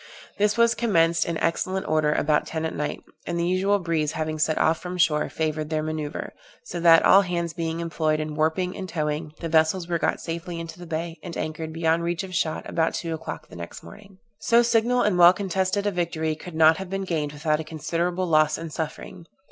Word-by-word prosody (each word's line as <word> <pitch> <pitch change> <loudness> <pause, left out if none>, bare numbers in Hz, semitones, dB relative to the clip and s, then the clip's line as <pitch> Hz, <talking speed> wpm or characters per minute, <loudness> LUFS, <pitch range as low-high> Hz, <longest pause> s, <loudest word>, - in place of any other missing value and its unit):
This 210 +2 +2
was 235 0 +5
commenced 170 -8 +2
in 170 -1 -2
excellent 185 +4 -1
order 155 -1 +2
about 150 0 +1
ten 160 0 -3
at 160 - -3
night, 150 - -4 0.2
and 175 - -2
the 170 - +1
usual 190 +3 +2
breeze 165 -5 -1
having 155 0 -3
set 155 +1 +1
off 160 - +2
from 180 0 -6
shore 160 -4 +2
favored 155 -1 -2
their 155 -1 -1
manoeuvre, 155 -1 -4 0.3
so 170 +2 -6
that, 165 -1 +6
all 195 - +7
hands 170 -3 -2
being 165 -1 -3
employed 155 -2 0
in 155 0 -3
warping 160 +4 0
and 185 -1 -6
towing, 155 -1 -2
the 165 - -2
vessels 160 +2 +2
were 170 -1 -1
got - - 0
safely 170 +1 -5
into 165 +1 -8
the 175 - -9
bay, 165 +1 -4
and 175 -2 -7
anchored, 160 0 -4
beyond 165 +1 +1
reach 170 0 -1
of 185 -1 -8
shot, 160 -2 -1
about 165 -1 0
two 165 -1 -3
o'clock 160 0 -6
the - - -13
next 85 0 -8
morning. 200 -2 -14 0.2
So 235 +1 +4
signal 240 +1 +2
and 190 -4 +1
well 175 +1 +9
contested 190 +1 -1
a 205 - +1
victory 165 -3 -1
could 160 +1 -10
not 160 0 +6
have 190 -1 -6
been 195 0 -2
gained 155 -5 -2
without 150 +1 0
a - - -3
considerable 170 +4 -2
loss 155 -3 +3
and 165 -2 -7
suffering. 165 +2 -6
165 Hz, 215 wpm, -25 LUFS, 155-180 Hz, 0.3 s, well